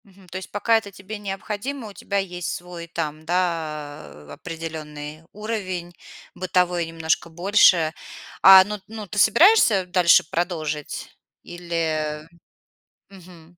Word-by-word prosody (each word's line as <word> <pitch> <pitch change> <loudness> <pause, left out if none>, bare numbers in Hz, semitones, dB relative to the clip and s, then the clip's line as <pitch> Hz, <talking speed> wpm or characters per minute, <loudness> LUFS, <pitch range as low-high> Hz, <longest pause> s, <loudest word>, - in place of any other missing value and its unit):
Мгм. 195 -2 -20
То 185 - -6
есть 190 - -9
пока 225 +2 +2
это 205 -2 -6
тебе 195 +3 -9
необходимо, 210 +6 -5
у - - -12
тебя 200 0 -4
есть 180 -3 -3
свой, 175 -1 -9
там, 155 -2 -4
да, 160 -4 -2
э, 75 0 -14
определённый 155 -2 -7
уровень 190 -5 -5 0.4
бытовой 180 -2 0
немножко 165 0 -1
больше. 175 -2 +4 0.5
А, 190 -1 +10
ну 210 +2 -6
ну, 220 -1 -8
ты 210 +2 -3
собираешься 235 - +5
дальше 180 -1 +5
продолжить 155 -4 -3 0.3
или 160 -3 -3 0.8
Мгм. 175 -3 -16
175 Hz, 125 wpm, -23 LUFS, 160-195 Hz, 0.8 s, А